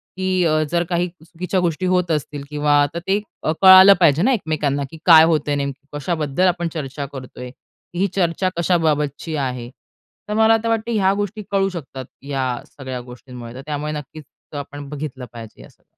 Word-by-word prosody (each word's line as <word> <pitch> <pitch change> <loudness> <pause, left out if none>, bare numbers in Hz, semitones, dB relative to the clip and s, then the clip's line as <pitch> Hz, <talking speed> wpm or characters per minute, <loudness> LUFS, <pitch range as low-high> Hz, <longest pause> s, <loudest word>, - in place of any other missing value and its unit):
की 185 -1 0
अ, 155 -1 +2
जर 170 0 +2
काही 175 0 0
चुकीच्या 175 +2 -4
गोष्टी 175 0 -1
होत 180 -2 +1
असतील 145 -2 -3
किंवा 150 0 +1
आता 145 +4 -1
ते 200 +2 +2 0.2
अ, - - +1
कळालं 190 +1 +10
पाहिजे 160 -2 +4
ना 260 +6 +3
एकमेकांना 150 - -1
की 160 - -10
"काय 160 -3 +9
होतंय 150 -3 +1
नेमकी 140 0 -4
कशाबद्दल 155 +2 0
आपण 175 -1 0
चर्चा 140 -2 -5
करतोय? 125 -1 -8 0.4
ही 190 +3 +1
चर्चा 185 0 +1
कशाबाबतची 160 -3 0
आहे?" 125 -4 -3 0.6
तर - - -1
मला 220 +1 +5
आता 225 +1 0
वाटतं 225 +1 -1
ह्या 195 -4 +2
गोष्टी 205 +1 -3
कळू 195 -1 +2
शकतात 140 -7 -7 0.2
या 140 -2 -2 0.2
सगळ्या 130 -3 -7
गोष्टींमुळे 125 -1 -11
तर 130 - -8
त्यामुळे 150 0 -3
नक्कीच 150 +1 -8 0.3
आपण 145 0 -7
बघितलं 140 -3 -6
पाहिजे 115 -2 -11
हे - - -14
सगळं. - - -28
155 Hz, 175 wpm, -20 LUFS, 140-185 Hz, 0.6 s, कळालं